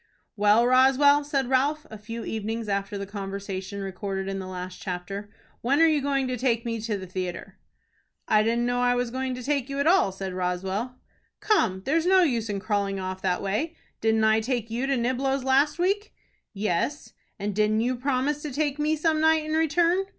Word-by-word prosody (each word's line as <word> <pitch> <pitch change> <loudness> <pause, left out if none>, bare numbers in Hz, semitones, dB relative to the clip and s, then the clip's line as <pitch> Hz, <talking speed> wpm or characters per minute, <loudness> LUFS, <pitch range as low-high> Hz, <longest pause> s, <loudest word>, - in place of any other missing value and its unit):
"Well, 210 +2 +4
Roswell," 270 +3 +5
said 275 -3 -1
Ralph, 290 +4 +1
a 220 - -7
few 230 +2 -7
evenings 220 +1 -3
after 200 0 -2
the 200 - -4
conversation 195 0 -5
recorded 195 0 -4
in 195 0 -3
the 190 - -6
last 180 0 -7
chapter, 195 +3 -5 0.3
"when 275 +5 +2
are 330 - +7
you 310 -3 +3
going 275 -1 0
to 255 0 -2
take 235 -2 0
me 230 -1 -2
to 215 -2 -2
the 190 - -7
theatre?" 180 -1 -6 0.7
"I 215 - +4
didn't 235 +2 +1
know 245 0 0
I 245 0 +3
was 245 -1 -1
going 260 0 -2
to 250 - -7
take 280 -1 -1
you 275 - -4
at 280 - +1
all," 340 - +4
said 190 0 -5
Roswell. 190 +6 -2 0.4
"Come, 210 - +1
there's 325 +5 +1
no 375 0 +6
use 235 -8 0
in 200 -1 -2
crawling 200 -1 -1
off 185 0 -5
that 180 -1 0
way. 250 +13 -1 0.3
Didn't 220 0 +2
I 220 0 +4
take 230 -1 -2
you 245 +4 -1
to 275 -1 +1
Niblo's 260 +2 0
last 275 +4 +3
week?" 400 +4 -1 0.4
"Yes." 210 - -2 0.2
"And 205 0 -3
didn't 215 +2 +2
you 250 +2 0
promise 270 +3 -1
to 300 - -5
take 295 +1 -1
me 305 +1 +2
some 310 0 +1
night 315 -1 +3
in 310 - -4
return?" 335 +4 +2
235 Hz, 200 wpm, -26 LUFS, 200-280 Hz, 0.7 s, are